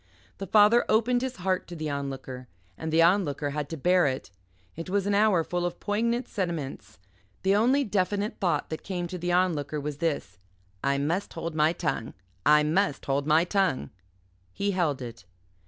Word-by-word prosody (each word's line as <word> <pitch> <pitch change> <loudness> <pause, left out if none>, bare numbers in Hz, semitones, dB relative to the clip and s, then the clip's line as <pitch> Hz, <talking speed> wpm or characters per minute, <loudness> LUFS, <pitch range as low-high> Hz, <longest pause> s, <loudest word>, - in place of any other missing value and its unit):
The 195 - -5
father 215 +5 +6
opened 245 +3 +3
his 260 -1 -3
heart 185 0 -1
to 175 - -8
the 155 -2 -3
Onlooker 135 -2 -5 0.3
and 160 +7 -5
the 165 +1 +5
Onlooker 155 -6 +2
had 145 -1 -3
to 165 - -5
bear 180 +3 +3
it. 130 -6 -4 0.4
It 165 +2 -6
was 195 0 0
an 205 - +1
hour 200 -4 +4
full 175 +2 -2
of 175 - -3
poignant 235 +4 0
sentiments. 170 -8 -4 0.5
The 195 +1 +3
only 255 +7 +3
definite 205 -1 -1
thought 170 -6 0
that 160 - -4
came 180 -3 -3
to 180 - -5
the 175 +1 -1
Onlooker 160 -5 +1
was 145 0 -4
this 155 - -2 0.4
"I 140 0 +2
must 165 +8 -1
hold 165 0 -4
my 155 +1 +3
tongue. 150 -9 -3 0.3
I 150 0 +6
must 160 0 0
hold 140 +1 0
my 155 +2 +5
tongue." 180 - 0 0.6
He 200 - -1
held 160 -8 0
it. 115 -3 -9
170 Hz, 180 wpm, -27 LUFS, 145-200 Hz, 0.6 s, father